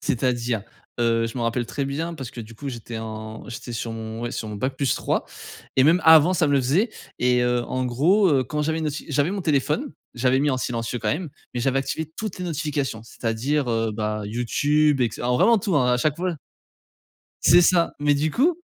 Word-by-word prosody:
C'est-à-dire, 120 -3 0 0.4
heu, 115 -1 +2
je 115 +3 -6
me - - -2
rappelle 115 +1 0
très 140 +3 -3
bien 160 +5 -3
parce 130 -6 -7
que 120 - -8
du 115 +1 -10
coup, 140 +5 -7
j'étais 115 -2 -6
en 110 0 -7
j'étais 120 0 -7
sur 115 0 -4
mon 110 +1 -6
ouais, 120 - -2
sur 110 - -4
mon 105 - -6
bac 130 +5 -2
plus 135 -3 +1
3, - - -1 0.5
et 130 - +5
même 165 +5 +5
avant, 160 +2 +7
ça 165 -2 +2
me 145 - +1
le 140 - +4
faisait, 165 - +1 0.3
et 125 0 +3
heu, 120 0 +1
en 130 +2 -2
gros, 165 - +3
heu, 135 -5 +3
quand 150 +4 -2
j'avais 160 +2 0
une 160 - -2
noti 150 0 -4
j'avais 150 +2 +1
mon 200 0 -3
téléphone, 155 - 0 0.2
j'avais 125 +2 +2
mis 145 +1 +2
en 130 - 0
silencieux 120 -1 -3
quand - - -2
même, 160 0 -4 0.2
mais 120 - -1
j'avais 135 +2 +1
activé 155 +3 -3
toutes 215 -4 -4
les 180 - -4
notifications, 145 -8 -2
c'est-à-dire, 120 +5 -1
heu, 115 -1 0
bah, 105 0 -2
YouTube, 145 +6 +1
et - - +4
cetera, 120 - -5
alors 125 0 +2
vraiment 230 - +5
tout, 190 -4 0
hein, 125 -3 +3
à - - +3
chaque 145 +4 0
fois 180 0 -1 1.1
C'est 175 +4 +7
ça. 170 -1 +3
Mais 145 0 +3
du 150 +2 0
coup, 320 - +2
135 Hz, 225 wpm, -23 LUFS, 120-155 Hz, 1.1 s, avant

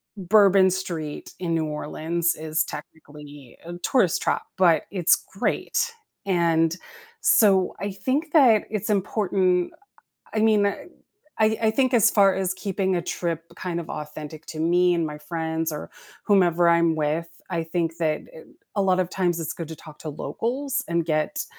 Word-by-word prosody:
Bourbon 195 -1 +5
Street 170 -5 -5
in 170 -2 -1
New 160 -1 0
Orleans 160 +3 -2
is 155 0 -1
technically 145 -3 -11
a 170 - -7
tourist 185 -2 +2
trap, - - 0
but 170 -4 +4
it's 185 -4 +4
great, 470 - -2 0.4
and 170 -2 +2 0.4
so 195 -4 +4
I 200 - -3
think 265 +11 -2
that 245 -9 +5
it's 215 0 -2
important, 185 -3 +1 0.6
I 215 - 0
mean, 215 -2 +4
I 200 - -1 0.6
I 220 0 +2
think 255 +3 +1
as 230 -1 +5
far 195 -3 +4
as 190 -1 -1
keeping 190 -1 -1
a 175 - 0
trip 165 -1 -3
kind 175 -2 -3
of 165 - -12
authentic 150 +1 -7
to 155 - -7
me 175 +2 +3
and 170 -1 0
my 150 -1 -5
friends 160 +1 -3
or 150 - -6 0.3
whomever 175 -4 +4
I'm 170 -1 +3
with, 155 +2 -1 0.2
I 170 -3 -1
think 165 0 -2
that 155 -2 0
eh 160 - -11 0.3
a 200 - +3
lot 185 -1 +2
of 180 -1 0
times 175 -3 0
it's 165 0 -3
good 165 -1 -6
to 160 - -6
talk 150 0 -14
to 155 - -6
locals 255 - -3
and 170 -1 0
get 160 - -1
175 Hz, 165 wpm, -24 LUFS, 160-195 Hz, 0.6 s, Bourbon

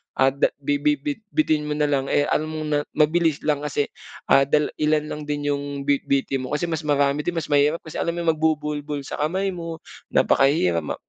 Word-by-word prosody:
ah, 135 0 +4
da 140 - +2 0.2
bi 145 +1 +1
bi 150 +1 +3
bitbitin 150 - -1
mo 150 - -1
nalang, 145 -2 +1
eh, 145 - +2
alam 155 +1 +1
mong 155 -1 -4
na 145 - +3 0.2
mabilis 160 0 +2
lang 150 -2 +1
kasi, 145 0 -1 0.4
ah, 135 0 +6
dal 150 0 +2
ilan 150 0 +2
lang 150 - -5
din 145 0 -1
'yung 140 0 -3
bitbitin 140 -2 0
mo, 150 - -2
kasi 150 - -2
mas 160 +1 -1
marami 145 0 +1
din 175 - 0
mas 165 - -3
mahirap. 145 +3 +3
Kasi 160 - -7
alam 170 - -1
mo 170 -1 +2
magbubuhol-buhol 150 -2 -1
sa 140 - -6
kamay 190 +6 0
mo, 165 -2 -7 0.3
napakahirap. 135 - +3
Ma 75 - -4
150 Hz, 200 wpm, -23 LUFS, 140-155 Hz, 0.4 s, ah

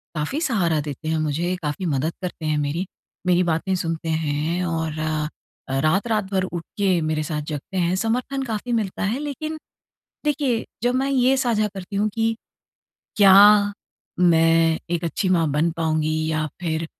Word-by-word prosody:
काफ़ी 155 - -2
सहारा 185 - +1
देते 145 +1 -6
हैं 160 - +1
मुझे 160 +4 -1
काफ़ी 150 +5 -3
मदद 155 +1 0
करते 175 -3 -5
हैं 155 -1 +1
मेरी। 150 +6 -1 0.4
मेरी 180 0 +4
बातें 170 +3 0
सुनते 165 -2 -3
हैं 160 +2 -1
और 160 -2 -2
अ, 155 -3 -4
रात-रात 195 +6 +1
भर 190 -1 +1
उठ 175 -2 -4
के 190 -4 +2
मेरे 155 -1 -1
साथ 150 0 -3
जगते 150 +6 -6
हैं। 175 0 +1
समर्थन 250 +6 -1
काफ़ी 230 0 -4
मिलता 210 -4 -1
है 215 +7 0
लेकिन 300 +2 -4 0.7
देखिए 280 -6 0 0.2
जब 245 +1 +2
मैं 270 +2 +1
ये 265 0 +3
साझा 230 -5 +1
करती 195 +1 -6
हूँ 210 +2 +2
कि 225 0 +1 0.8
क्या 205 +1 +7 0.5
मैं 165 -1 +4
एक 175 -1 -1
अच्छी 185 +4 -1
माँ 170 -3 +3
बन 155 +4 +2
पाऊँगी 155 -1 0
या 155 -1 0
फ़िर 165 -2 -2
175 Hz, 160 wpm, -23 LUFS, 155-210 Hz, 0.8 s, क्या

